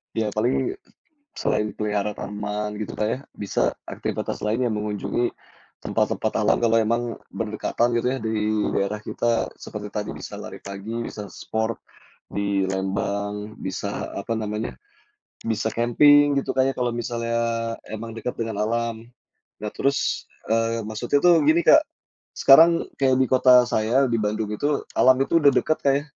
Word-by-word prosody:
Ya 110 -1 0
paling 120 - 0 0.6
selain 105 0 -1
peliharaan 105 -1 -1
taman, 105 +1 -4
gitu 105 - -5
Kak 105 - -1
ya, 125 - -1 0.2
bisa 100 - -1 0.2
aktivitas - - -3
lainnya 115 +3 +1
mengunjungi 105 +2 -2 0.5
tempat-tempat - - 0
alam, - - +3
kalau 115 -1 +4
memang 115 +2 +1 0.3
berdekatan 115 +2 -1
gitu 120 - -1
ya - - -3
di 110 0 -1 0.4
daerah 105 +2 -1
kita. 115 +2 0
Seperti 105 -1 -7
tadi, 105 0 -4
bisa - - -8
lari - - -9
pagi, 100 +3 -7
bisa 105 -3 -6
sport 110 +1 -3 0.5
di 100 -1 0
Lembang 100 +2 -3
bisa, 100 +2 -4
apa 110 +3 -3
namanya 105 - -4 0.6
bisa 110 -1 -2
camping 145 +5 +5
gitu 140 - -2
Kak 130 0 +3
ya, - - -2
kalau 120 -1 0
misalnya 115 0 -2 0.5
memang 110 +1 -6
dekat 115 +2 -5
dengan 110 -3 -2
alam. 115 0 -1 0.6
Nah 105 - -4
terus, 140 0 0 0.2
eee, 115 0 +1
maksudnya 110 +6 0
tuh 175 -3 +6
gini, 160 +3 +4
Kak. 310 - +8 0.5
Sekarang 165 +5 +7 0.2
kayak 135 -2 +4
di 130 - +3
kota 125 -1 +7
saya 120 +3 +2
di 115 - +1
Bandung 105 0 -1
itu, 145 +7 -1
alam 130 0 +6
itu 165 +4 +2
sudah 145 -3 +6
dekat, 155 - +1
Kak, 140 - +4
ya, 140 - 0
115 Hz, 150 wpm, -24 LUFS, 105-125 Hz, 0.6 s, Kak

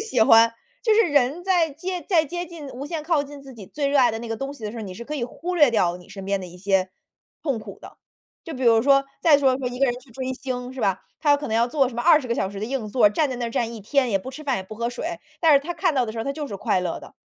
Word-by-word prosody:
喜 250 - -1
欢， 225 +1 +7 0.3
就 445 - +3
是 450 +2 +6
人 285 - +1
在 350 -5 +2
接 360 +4 -5
在 330 -5 +4
接 350 +3 -5
近 320 -4 -9
无 270 +3 -7
限 315 0 -4
靠 320 -4 +2
近 285 0 -10
自 270 -1 -11
己 205 -5 -11
最 290 -1 -2
热 280 0 +2
爱 245 -2 +5
的 225 - -4
那 235 - -7
个 225 - -3
东 270 +4 -4
西 225 - -10
的 210 - -3
时 - - -9
候， 225 - -5
你 190 -3 -7
是 235 - -8
可 300 - -5
以 265 - -3
忽 350 +8 -5
略 295 -7 +5
掉 180 -6 +1
你 180 - -16
身 195 -2 -9
边 195 0 -1
的 185 - -7
一 175 - -13
些 190 -1 +1 0.5
痛 275 -7 -1
苦 - - -10
的。 - - -13 0.5
就 330 - -7
比 260 - -6
如 230 -2 +5
说 275 +1 +4 0.2
再 300 -4 +6
说 265 -2 +3
说 260 - -4
一 250 0 -7
个 275 - +4
人 245 - 0
去 255 -1 -20
追 260 +2 -4
星 250 -1 -5
是 - - -10
吧， 195 -3 +1 0.2
他 300 -2 +1
要 285 - +6
可 290 - -5
能 220 - 0
要 235 +1 +3
做 270 0 +1
什 240 - -10
么 240 - -2
20 305 -6 +5
个 235 - +1
小 190 - -1
时 200 0 -7
的 215 - -2
硬 255 -3 -3
座 220 -1 +4
儿， - - +5
站 290 +4 +1
在 255 - -3
那 240 -1 -2
儿 - - -5
站 230 0 -2
一 220 - -8
天， 255 +3 +1
也 195 - +2
不 255 +8 -8
吃 305 +3 -10
饭， 270 -3 0
也 - - -5
不 215 +3 -10
喝 235 +2 -2
水， 250 +6 -5 0.3
但 320 -2 +5
是 - - +7
他 345 +4 -4
看 345 -6 +1
到 255 -2 +2
的 220 - -5
时 230 - -7
候 - - -1
儿， - - -8
他 275 - -1
就 295 0 -5
是 205 - -7
快 185 - 0
乐 180 - -3
的。 - - -14
255 Hz, 360 characters per minute, -23 LUFS, 225-295 Hz, 0.5 s, 欢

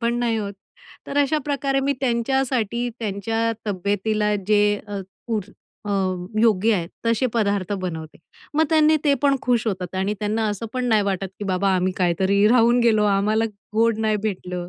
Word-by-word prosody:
पण 235 0 0
नाही 235 -2 0
होत. 205 -2 -3 0.5
तर 280 - -5
अशाप्रकारे 280 -2 0
मी 280 +1 +1
त्यांच्यासाठी, 245 -2 0
त्यांच्या 225 +2 -1
तब्येतीला 205 +2 0
जे 210 -1 +4 0.2
अ, 205 -1 -4 0.3
पूर 220 -4 -1 0.4
अ, 205 - -4 0.5
योग्य 220 -1 +3
आहेत 170 -3 -2 0.2
तसे 230 +3 +2
पदार्थ 205 -3 0
बनवते. 165 -6 -5 0.4
मग 315 +1 +4
त्यांनी 310 0 +5
ते 285 -1 +4
पण 280 -1 +4
खुश 240 -3 +1
होतात 185 -3 -3
आणि 195 +2 0
त्यांना 215 +1 0
असं 205 +2 -4
पण 255 -1 -2
नाही 215 -3 +3
वाटत, 195 -1 -1
की 205 - -5
बाबा 195 0 0
आम्ही 185 0 +1
कायतरी 190 +3 +2
राहून 240 0 +4
गेलो, 220 -3 +3
आम्हाला 210 +2 +2 0.3
गोड 225 0 +2
नाही 215 -1 +1
भेटलं. 180 -4 -4
215 Hz, 165 wpm, -22 LUFS, 200-240 Hz, 0.5 s, त्यांनी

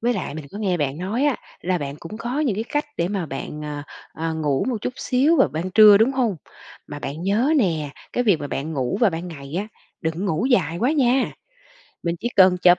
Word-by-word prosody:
Với 240 +1 +1
lại 180 -7 -4
mình 155 -2 -6
có 205 - -7
nghe 190 -4 0
bạn 145 -2 -2
nói 205 +10 -1
á, 290 -3 +2 0.2
là 180 0 0
bạn 140 -2 -5
cũng 170 +6 -8
có 245 +5 -2
những 270 -9 +1
cái 220 +3 -2
cách 295 +5 -1
để 170 - 0
mà 195 -4 -2
bạn, 140 +2 -6
ờ, 150 -1 -5 0.3
ờ, 160 0 -3
ngủ 150 -4 0
một 250 - 0
chút 250 - -3
xíu 275 +6 +2
vào 265 - +5
ban 160 +7 -4
trưa, 210 +1 +8
đúng 230 +5 +4
hông? 240 -8 0 0.5
Mà 145 - -7
bạn 145 +3 -5
nhớ 215 - +2
nè, 160 - 0 0.2
cái 245 - 0
việc 205 -6 +4
mà 145 - -3
bạn 145 +3 -4
ngủ 135 +5 -1
vào 230 -5 +5
ban 170 +2 -5
ngày 140 -3 -9
á, 205 +2 -3 0.3
đừng 160 -2 -1
có 170 - -6
ngủ 195 +2 0
dài 175 - +2
quá 250 +9 +2
nha, 260 -3 +2 0.7
mình 170 0 -1
chỉ 240 - -1
cần 185 -2 +7
chợp 175 0 +7
185 Hz, 245 wpm, -23 LUFS, 155-235 Hz, 0.7 s, trưa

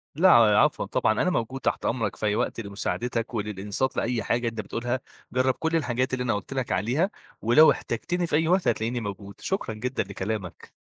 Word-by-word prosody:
لأ، 185 +5 +5
ع 110 -3 +6
عفوًا - - +1
طبعًا 110 0 +1
أنا 180 - +2
موجود 130 -5 -2
تحت - - -1
أمرَك 115 -4 -1
في - - -4
أي 105 0 +2
وقت، - - -1
لمُساعدتَك 115 +3 -3
وللإنصات 105 +3 -2
لأي 115 -2 0
حاجة 120 +3 0
أنت 115 -1 -3
بتقولها، 120 +3 -3 0.3
جرَّب 130 +1 +2
كُلّ 160 +4 -1
الحاجات 130 -4 0
اللي 125 -1 0
أنا 120 - +1
قُلت 105 +6 -5
لَك 130 -3 -2
عليها، 125 - +1 0.3
ولو 135 +8 +7
احتاجتني 175 +9 -2
في 150 - 0
أي 160 +1 +2
وقت 180 +1 +2
هتلاقيني 120 +2 0
موجود، 100 -1 -7
شكرًا 190 - -2
جدًا 125 +4 -2
لكلامَك. 100 -2 -5
120 Hz, 195 wpm, -26 LUFS, 110-130 Hz, 0.3 s, ولو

